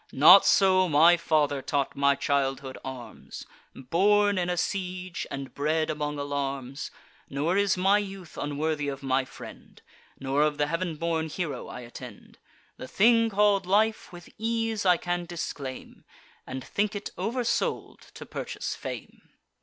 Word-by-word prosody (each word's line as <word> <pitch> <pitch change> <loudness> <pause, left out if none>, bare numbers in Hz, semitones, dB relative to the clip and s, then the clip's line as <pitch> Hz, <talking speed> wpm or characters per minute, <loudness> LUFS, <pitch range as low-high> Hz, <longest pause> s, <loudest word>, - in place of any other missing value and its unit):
Not 170 +8 +8
so 185 -2 +4
my 160 +4 +6
father 150 -4 +1
taught 140 0 -1
my 140 0 +3
childhood 135 -1 -1
arms; 130 -2 -9 0.3
Born 205 +8 +2
in 175 0 -1
a 180 - -1
siege, 185 -1 -3
and 135 -1 -6
bred 155 +2 0
among 150 -1 -3
alarms! 140 -1 -4 0.4
Nor 150 +6 0
is 200 -1 +2
my 195 +3 +4
youth 195 -4 -8
unworthy 145 +1 -2
of 140 -1 -5
my 130 0 +1
friend, - - -12 0.4
Nor 135 +2 0
of 150 -1 +2
the 145 - +2
heav'n 165 +2 -2
born 160 0 -2
hero 150 -6 -4
I 125 - -8
attend. 120 0 -12 0.4
The - - -8
thing 230 - +4
call'd 200 -2 +2
life, 215 +2 +1
with 175 -1 -12
ease 225 -2 -1
I 180 -1 +5
can 175 +1 -3
disclaim, 145 -6 -6 0.4
And 130 0 -6
think 205 +1 -1
it 205 - -5
over 245 +2 -2
sold 235 - -2 0.2
to - - -9
purchase - - -5
fame." - - -8
160 Hz, 150 wpm, -27 LUFS, 140-195 Hz, 0.4 s, Not